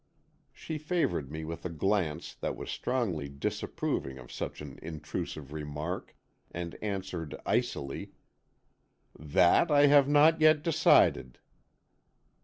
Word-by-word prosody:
She 155 Hz, -1 st, -6 dB
favoured 145 Hz, -, -1 dB
me 80 Hz, 0 st, -5 dB
with 80 Hz, +1 st, -6 dB
a 90 Hz, -, -3 dB
glance 85 Hz, -1 st, -1 dB
that -, -, -4 dB
was -, -, -6 dB
strongly 90 Hz, -, -2 dB
disapproving 70 Hz, -1 st, -3 dB
of 60 Hz, -1 st, -12 dB
such -, -, -5 dB
an 70 Hz, -3 st, -9 dB
intrusive 75 Hz, -2 st, -6 dB
remark, 75 Hz, +3 st, -5 dB, 0.3 s
and 85 Hz, -1 st, -5 dB
answered, 95 Hz, -6 st, -4 dB
icily: 70 Hz, 0 st, -2 dB, 1.1 s
"That 85 Hz, -, +4 dB
I 145 Hz, -1 st, +6 dB
have 140 Hz, -1 st, +6 dB
not 155 Hz, +2 st, +5 dB
yet 155 Hz, -1 st, +5 dB
decided." 145 Hz, -, +3 dB
85 Hz, 115 wpm, -30 LUFS, -, 1.1 s, I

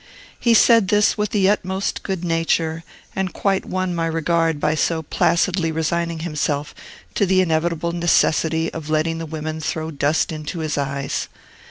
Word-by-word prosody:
He 235 Hz, -1 st, +3 dB
said 230 Hz, -2 st, +5 dB
this 210 Hz, +2 st, +3 dB
with 210 Hz, -1 st, -1 dB
the 195 Hz, -3 st, +2 dB
utmost 190 Hz, -1 st, -1 dB
good 190 Hz, -2 st, -4 dB
nature, 165 Hz, -1 st, 0 dB, 0.3 s
and 190 Hz, -1 st, -1 dB
quite 195 Hz, -1 st, 0 dB
won 185 Hz, -1 st, -2 dB
my 165 Hz, -1 st, -1 dB
regard 165 Hz, -1 st, 0 dB
by 150 Hz, -, +1 dB
so 160 Hz, +1 st, 0 dB
placidly 170 Hz, +2 st, +1 dB
resigning 165 Hz, +1 st, -1 dB
himself 150 Hz, -3 st, -2 dB, 0.4 s
to 200 Hz, -, +1 dB
the 190 Hz, 0 st, +3 dB
inevitable 170 Hz, -1 st, 0 dB
necessity 165 Hz, -1 st, +1 dB
of 160 Hz, -2 st, -7 dB
letting 160 Hz, +1 st, 0 dB
the 165 Hz, -, -5 dB
women 155 Hz, 0 st, -5 dB
throw 160 Hz, +1 st, -3 dB
dust 145 Hz, +2 st, 0 dB
into 155 Hz, +2 st, -5 dB
his 155 Hz, -2 st, -2 dB
eyes. 140 Hz, -1 st, -2 dB
165 Hz, 160 wpm, -21 LUFS, 155-185 Hz, 0.4 s, said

